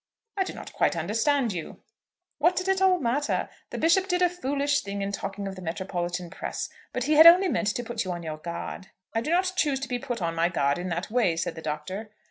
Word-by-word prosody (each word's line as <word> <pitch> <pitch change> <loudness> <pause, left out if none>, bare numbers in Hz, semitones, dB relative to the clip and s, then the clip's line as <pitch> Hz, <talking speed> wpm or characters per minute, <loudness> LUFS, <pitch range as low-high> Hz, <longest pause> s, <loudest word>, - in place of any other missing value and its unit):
"I 390 - +2
do - - -6
not - - -9
quite - - +2
understand 240 +1 +1
you." 170 -3 -6 0.6
"What 345 +4 +4
did 370 - -2
it 385 0 +2
all 375 -1 +5
matter? 280 +2 0 0.2
The - - -5
Bishop 355 +4 +3
did 360 -1 +1
a 355 - +5
foolish 285 -4 0
thing 200 0 -4
in 200 - -2
talking 200 0 -4
of 195 - -5
the 185 - -9
metropolitan 175 0 -3
press. - - -4 0.2
But 250 - -2
he 300 +4 +2
had 315 +2 +10
only 365 +3 +8
meant 220 - 0
to 245 - -2
put 235 -1 -3
you 185 - -4
on 175 -1 -5
your 155 -1 -4
guard." 170 +4 -6 0.3
"I 225 - +1
do 255 - -4
not 365 +2 +2
choose 290 -6 +1
to 270 - -3
be 250 -2 -2
put 245 0 -4
on 170 -2 -1
my 165 +1 +2
guard 140 -3 +1
in 180 +1 -4
that 175 +4 -3
way," 215 -9 +2
said 165 - -1
the 160 - -9
Doctor. 160 +8 -4
225 Hz, 245 wpm, -27 LUFS, -, 0.6 s, had